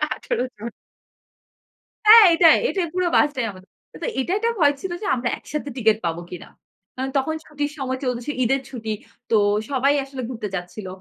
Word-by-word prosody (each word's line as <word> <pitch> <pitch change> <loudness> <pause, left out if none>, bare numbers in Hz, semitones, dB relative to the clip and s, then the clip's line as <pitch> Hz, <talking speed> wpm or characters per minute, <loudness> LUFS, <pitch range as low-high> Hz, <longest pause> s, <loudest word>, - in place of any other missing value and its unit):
১৮ - - -3
জন। 225 +3 -7 1.4
হ্যাঁ, 445 0 +10
এটাই, 330 -2 +7
এটাই 365 -4 -1
পুরো 365 -1 +1
বাসটাই 280 -5 +2
আমাদের। 185 0 -16 0.3
তো - - -1
এটা 300 +7 -2
একটা 460 +1 +1
ভয় 290 -2 +5
ছিল 380 - -4
যে - - -5
আমরা 245 0 -2
একসাথে 295 -1 -6
টিকেট 220 -2 +3
পাবো 170 +1 -2
কিনা? 180 - -9 0.5
কারণ 260 +1 -3
তখন 315 +4 0
ছুটির 290 -1 -4
সময় 260 -1 -3
চলতেছে 250 +2 -2
ঈদের 270 +3 +1
ছুটি। 225 -4 -7 0.4
তো 225 - +3 0.3
সবাই 275 +1 +2
আসলে 270 -1 -7
ঘুরতে 220 -4 -5
যাচ্ছিল। 180 +2 -6
265 Hz, 170 wpm, -22 LUFS, 230-300 Hz, 1.4 s, হ্যাঁ